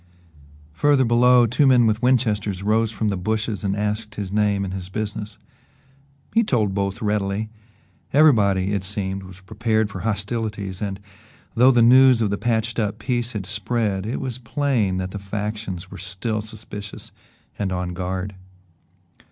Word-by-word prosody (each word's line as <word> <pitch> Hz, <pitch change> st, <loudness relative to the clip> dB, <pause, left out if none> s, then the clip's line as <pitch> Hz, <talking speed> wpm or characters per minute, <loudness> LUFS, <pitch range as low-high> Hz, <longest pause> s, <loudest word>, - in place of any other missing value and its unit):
Farther 140 Hz, -, +3 dB
below, 120 Hz, +1 st, +5 dB
two 125 Hz, +5 st, +2 dB
men 125 Hz, -3 st, +5 dB
with 110 Hz, 0 st, +1 dB
Winchesters 105 Hz, -7 st, +1 dB
rose 110 Hz, +2 st, +2 dB
from 110 Hz, -1 st, -1 dB
the 100 Hz, -, -1 dB
bushes 110 Hz, +1 st, -2 dB
and 100 Hz, -1 st, 0 dB
asked 105 Hz, +1 st, -2 dB
his 100 Hz, -3 st, -5 dB
name 100 Hz, -1 st, +1 dB
and 95 Hz, -, -5 dB
his 95 Hz, -1 st, -6 dB
business. 105 Hz, +1 st, -5 dB, 1.0 s
He 230 Hz, -, +4 dB
told 110 Hz, -, +1 dB
both 100 Hz, +1 st, -2 dB
readily. 105 Hz, +1 st, -1 dB, 0.6 s
Everybody, 100 Hz, -10 st, +4 dB
it 100 Hz, -2 st, -1 dB
seemed, 95 Hz, -1 st, -3 dB
was 95 Hz, 0 st, -12 dB
prepared 110 Hz, +1 st, -1 dB
for 95 Hz, -, -6 dB
hostilities 105 Hz, -2 st, -3 dB
and, 100 Hz, -2 st, -3 dB, 0.5 s
though 125 Hz, +2 st, +6 dB
the 120 Hz, -3 st, +5 dB
news 130 Hz, +1 st, +7 dB
of 105 Hz, -3 st, +1 dB
the 100 Hz, -, -2 dB
patched 115 Hz, 0 st, 0 dB
up 105 Hz, -1 st, -1 dB
peace 120 Hz, 0 st, -2 dB
had 105 Hz, -3 st, -4 dB
spread, 105 Hz, 0 st, -1 dB
it 115 Hz, -, -2 dB
was 130 Hz, -2 st, -4 dB
plain 120 Hz, -6 st, 0 dB
that 95 Hz, 0 st, -3 dB
the 105 Hz, -, -5 dB
factions 105 Hz, -2 st, -5 dB
were -, -, -9 dB
still 100 Hz, +4 st, -3 dB
suspicious 105 Hz, -2 st, -8 dB, 0.5 s
and 100 Hz, -2 st, -1 dB
on 90 Hz, -1 st, -2 dB
guard. 95 Hz, +2 st, -3 dB
105 Hz, 160 wpm, -22 LUFS, 100-115 Hz, 1.0 s, news